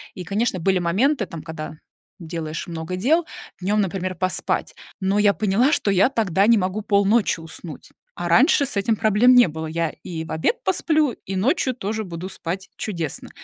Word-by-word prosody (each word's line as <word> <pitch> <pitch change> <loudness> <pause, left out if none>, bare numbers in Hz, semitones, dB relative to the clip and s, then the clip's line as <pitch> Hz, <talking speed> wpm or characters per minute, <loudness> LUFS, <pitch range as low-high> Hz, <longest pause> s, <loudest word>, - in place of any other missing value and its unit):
И, 180 - -6
конечно, 200 +1 -1
были 190 +2 +2
моменты, 210 - +1
там, 165 -4 -9
когда 155 -2 -7 0.4
делаешь 165 -1 -5
много 165 +1 -5
дел 310 - +2 0.4
днём, 205 +3 +1
например, 185 -1 -2
поспать, 185 +2 -1 0.2
но 195 +2 +1
я 205 -1 +4
поняла, 220 +7 +2
что 205 - +1
я 195 +6 +4
тогда 205 -5 +1
не 230 -1 +6
могу 190 +3 -1
полночи 200 -1 +2
уснуть, 160 -1 -10 0.2
а 175 - -4
раньше 275 - +4
с 235 - -5
этим 210 +3 +1
проблем 220 +4 +4
не 245 -6 +7
было. 160 0 -5
Я 165 0 -2
и 165 -2 -5
в - - -9
обед 470 - -1
посплю, 310 -6 +1
и 195 -4 -7
ночью 260 - +1
тоже 220 0 -3
буду 175 0 -6
спать 190 +2 -5
чудесно. 170 -8 -5
195 Hz, 180 wpm, -22 LUFS, 170-225 Hz, 0.4 s, не